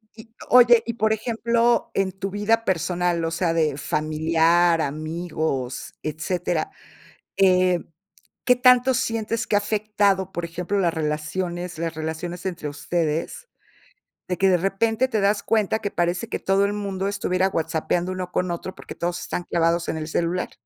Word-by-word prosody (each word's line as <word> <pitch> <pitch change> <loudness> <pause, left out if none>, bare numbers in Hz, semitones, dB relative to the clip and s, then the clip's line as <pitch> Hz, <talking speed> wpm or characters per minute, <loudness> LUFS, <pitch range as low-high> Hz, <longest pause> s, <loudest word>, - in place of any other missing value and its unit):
Y 225 0 -14 0.2
oye, 240 -2 +7
y, 235 - -2
por 220 -1 +1
ejemplo, 235 +1 +1
en 195 -1 0
tu 195 +1 -5
vida 225 +3 +1
personal, 175 -1 0
o 165 - -1
sea, 165 0 0
de 155 -4 +1
familiar, 160 +3 +2
amigos, 155 -3 -3
etcétera, 160 +2 -2 0.7
eh, 185 -2 +4 0.6
¿qué 250 -1 +5
tanto 250 +1 +5
sientes 230 -2 -1
que 205 - +2
ha - - +6
afectado, 205 -2 0
por 175 - -3
ejemplo, 180 +4 -3
las 175 -3 +2
relaciones 160 +3 -3
las 165 -1 -3
relaciones 160 +3 -5
entre 175 -5 -4
ustedes, 160 - -2 0.8
de 180 -2 -2
que 195 +1 +3
de 180 - +4
repente 225 +7 +1
te 220 -4 -1
das 205 +1 +2
cuenta 220 -1 +1
que 200 - -3
parece 175 +1 -1
que - - -3
todo 195 +1 +2
el 205 - -1
mundo 195 -2 -3
estuviera 190 -2 0
whatsappeando 165 +2 -1
uno 185 -1 -5
con 180 -1 -1
otro, 180 +2 -5
porque - - -10
todos 175 0 -2
están 175 - -4
clavados 170 0 +1
en - - -2
el 155 0 -4
celular? 175 +2 -1
180 Hz, 160 wpm, -23 LUFS, 165-205 Hz, 0.8 s, oye